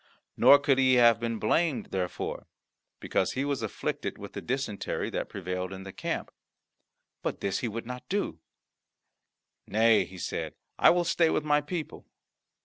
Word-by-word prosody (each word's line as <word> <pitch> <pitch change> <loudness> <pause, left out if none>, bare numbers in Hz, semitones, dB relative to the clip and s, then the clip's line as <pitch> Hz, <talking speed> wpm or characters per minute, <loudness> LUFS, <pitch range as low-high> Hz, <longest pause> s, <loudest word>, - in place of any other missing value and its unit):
Nor 140 - +8
could 140 -2 +2
he 130 -1 +5
have 120 -2 +6
been 115 -1 -2
blamed 150 +7 0
therefor, 90 -2 -3 0.5
because 95 - 0
he 135 +2 -1
was 140 -3 -1
afflicted 110 - -3
with - - -9
the - - -5
dysentery 125 -5 -3
that - - -3
prevailed 90 -1 -4
in 95 0 -7
the 95 -1 -9
camp. - - -3 0.9
But - - -3
this 100 - -1
he 125 - -2
would 115 +1 -5
not 125 +1 -8
do; 195 - -1 1.3
"Nay," 110 0 +4
he 95 - -12
said, - - -4 0.2
"I - - +7
will 175 0 +3
stay 170 -1 +3
with 155 - 0
my 150 0 +3
people." 155 +1 -6
120 Hz, 160 wpm, -28 LUFS, 100-145 Hz, 1.3 s, Nor